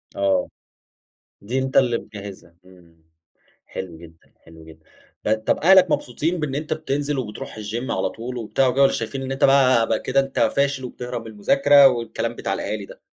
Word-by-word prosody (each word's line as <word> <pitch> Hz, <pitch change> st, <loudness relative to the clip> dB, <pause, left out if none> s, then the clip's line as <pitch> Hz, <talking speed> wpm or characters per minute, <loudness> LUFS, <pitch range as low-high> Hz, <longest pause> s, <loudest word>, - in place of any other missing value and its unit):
آه، 95 Hz, -2 st, +1 dB, 0.9 s
دي 120 Hz, +6 st, -2 dB
أنت 130 Hz, 0 st, -1 dB
اللي 120 Hz, -3 st, +3 dB
مجهزها، 100 Hz, -6 st, -11 dB
إمم 90 Hz, -3 st, -20 dB, 0.7 s
حلو 90 Hz, -3 st, -7 dB
جدًا، 80 Hz, 0 st, -17 dB
حلو 80 Hz, -1 st, -16 dB
جدًا، 80 Hz, 0 st, -16 dB, 0.4 s
آآ 105 Hz, -, +4 dB
طَب 110 Hz, 0 st, 0 dB
أهلك 185 Hz, +1 st, +5 dB
مبسوطين 160 Hz, +9 st, -1 dB
بإن 150 Hz, -3 st, -3 dB
أنت 150 Hz, +2 st, -2 dB
بتنزل 145 Hz, -1 st, -2 dB
وبتروح 105 Hz, -5 st, -6 dB
الGym 110 Hz, +4 st, -4 dB
على -, -, -1 dB
طول 125 Hz, +2 st, -7 dB
وبتاع 120 Hz, +3 st, 0 dB
وكده، 130 Hz, +2 st, +1 dB
والّا 135 Hz, -, +5 dB
شايفين 115 Hz, +4 st, -4 dB
إن 130 Hz, -, -5 dB
أنت 135 Hz, -, -3 dB
بقى 130 Hz, -4 st, +5 dB
بقى 110 Hz, -, 0 dB
كده 135 Hz, +1 st, 0 dB
أنت 135 Hz, 0 st, -2 dB
فاشل 140 Hz, +3 st, +1 dB
وبتهرب 125 Hz, -1 st, -6 dB
من 115 Hz, -, -11 dB
المذاكرة 140 Hz, +7 st, +5 dB
والكلام 115 Hz, -3 st, -2 dB
بتاع -, -, -3 dB
الأهالي 105 Hz, -1 st, -4 dB
ده؟ -, -, -15 dB
120 Hz, 180 wpm, -22 LUFS, 105-135 Hz, 0.9 s, أهلك